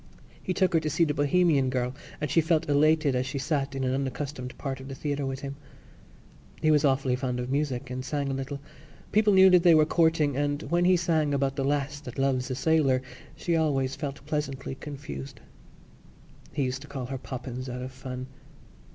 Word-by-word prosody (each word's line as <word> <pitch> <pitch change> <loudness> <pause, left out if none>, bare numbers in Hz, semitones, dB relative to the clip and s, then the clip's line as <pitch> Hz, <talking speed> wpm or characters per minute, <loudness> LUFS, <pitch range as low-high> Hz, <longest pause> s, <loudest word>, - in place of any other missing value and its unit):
He - - -3
took 185 -1 +2
her 165 - +5
to 155 -1 -2
see 155 +3 +2
The 150 -3 +1
Bohemian 145 -2 +3
Girl 125 0 -1 0.3
and 150 -3 -2
she 165 - +4
felt 160 0 +1
elated 150 -1 +3
as 125 +1 0
she 135 - -4
sat 140 -1 -1
in 135 - -2
an 130 0 +1
unaccustomed 135 -1 -4
part 135 -2 -4
of 130 - -9
the 135 - -6
theatre 145 0 -2
with 135 0 -4
him. 140 0 -6 1.0
He 155 0 +3
was 150 -1 +4
awfully 135 -2 +2
fond 125 -1 -2
of 125 +1 -3
music 135 -3 -1
and 130 0 -4
sang 140 +1 -2
a - - -2
little. 135 +1 -4 0.5
People 215 0 +4
knew 190 0 +8
that 180 -1 +6
they 170 -2 +6
were 155 -1 +6
courting 160 -3 +2
and, 145 +1 -1
when 175 +1 +3
he 180 0 +5
sang 160 -4 +1
about 135 -1 0
the 135 - -1
lass 145 +1 -1
that 125 -4 -9
loves 135 -1 +1
a 130 - -2
sailor, 140 -3 +2 0.3
she 170 - -1
always 135 -5 +1
felt 140 0 -6
pleasantly 140 -3 -3
confused. 130 - -8 1.1
He 140 +3 -1
used 130 +1 -2
to 145 - -11
call 130 -3 -5
her 135 +1 -5
Poppens 130 0 -6
out 125 +1 -5
of 130 - -6
fun. 130 0 -6
140 Hz, 205 wpm, -27 LUFS, 130-155 Hz, 1.1 s, knew